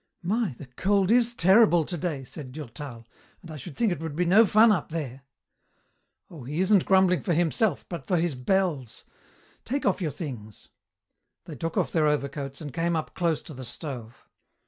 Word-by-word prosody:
"My, 205 - 0
the - - -9
cold 190 - +1
is 240 0 +4
terrible 190 -3 +5
today," 165 -5 -3
said 130 -1 -9
Durtal, 130 -4 -8 0.4
"and 170 - -10
I - - -7
should 145 +2 -9
think 230 -4 +2
it 175 - -2
would 160 -2 -5
be 180 +2 +1
no 205 +6 +6
fun 220 +3 +6
up 180 -7 0
there." 140 -5 -5 1.1
"Oh, 155 -7 -11
he 145 +6 -4
isn't 190 0 +4
grumbling 190 -2 +4
for 175 -6 0
himself 170 - +1
but 170 - -7
for 180 - +2
his 170 -1 0
bells. 145 - -1 0.6
Take 275 +3 -3
off 200 -1 +1
your 165 - 0
things." 125 - -8 0.8
They 155 - -8
took 165 +5 -4
off - - +1
their 155 -2 +2
overcoats 140 -1 -2
and 145 -4 -7
came 170 +1 0
up 155 - -3
close 170 -4 -1
to 155 - -9
the 130 -1 -8
stove. 120 -2 -7
165 Hz, 185 wpm, -26 LUFS, 140-190 Hz, 1.1 s, no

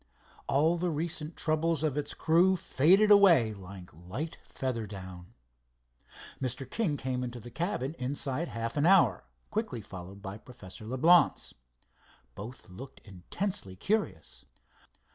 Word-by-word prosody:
All 155 +5 +3
the 180 +1 -1
recent 160 0 -3
troubles 160 0 +1
of 150 -4 0
its 150 - -3
crew 175 +4 +4
faded 190 +6 +4
away 170 - +6
like 95 -2 -11
light 95 - -6
feather 120 -5 -4
down. 95 -3 -10 1.1
Mr. 130 0 -3
King 160 - -1
came 130 -1 -2
into 120 0 -5
the 120 +2 -11
cabin 140 - -2
inside 140 +4 -2
of - - -10
half 115 +3 -3
an 145 +3 +3
hour, 140 - +4 0.3
quickly - - -2
followed 95 +2 -10
by 100 +1 -6
Professor 110 -4 -11
Leblance. 155 +9 +4 0.8
Both 115 +6 -9
looked 125 +10 -11
intensely 100 - -4
curious. 210 - -2
130 Hz, 130 wpm, -30 LUFS, 105-165 Hz, 1.1 s, away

